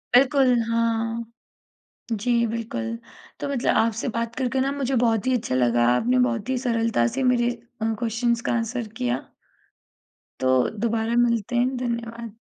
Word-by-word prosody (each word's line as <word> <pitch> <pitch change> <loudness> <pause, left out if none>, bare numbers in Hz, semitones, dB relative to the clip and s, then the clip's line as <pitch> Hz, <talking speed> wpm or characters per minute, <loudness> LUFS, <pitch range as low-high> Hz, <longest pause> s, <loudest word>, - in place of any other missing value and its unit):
बिल्कुल 270 0 +5 0.2
हाँ। 230 0 0 0.9
जी 225 +3 -1 0.2
बिल्कुल। 165 - -3 0.4
तो - - -3
मतलब 270 -4 +1
आपसे 225 +3 +1
बात 230 0 -2
करके 260 0 0
न 275 +1 0
मुझे 270 -1 -1
बहुत 225 -2 +2
ही 260 - +3
अच्छा 210 - -3
लगा 120 -2 +2
आपने 250 - +2
बहुत 250 -2 +1
ही 260 - 0
सरलता 230 - +1
से - - 0
मेरे 245 -2 +3 0.3
अ, 225 0 +1
क्वेश्चन्स 235 0 0
का - - +2
आंसर 235 0 -2
किया। 125 +1 0 1.2
तो 130 -1 +3
दोबारा 230 0 0
मिलते 235 -1 +1
हैं। 250 +2 +2
धन्यवाद। 235 -2 -4
235 Hz, 150 wpm, -24 LUFS, 225-250 Hz, 1.2 s, बिल्कुल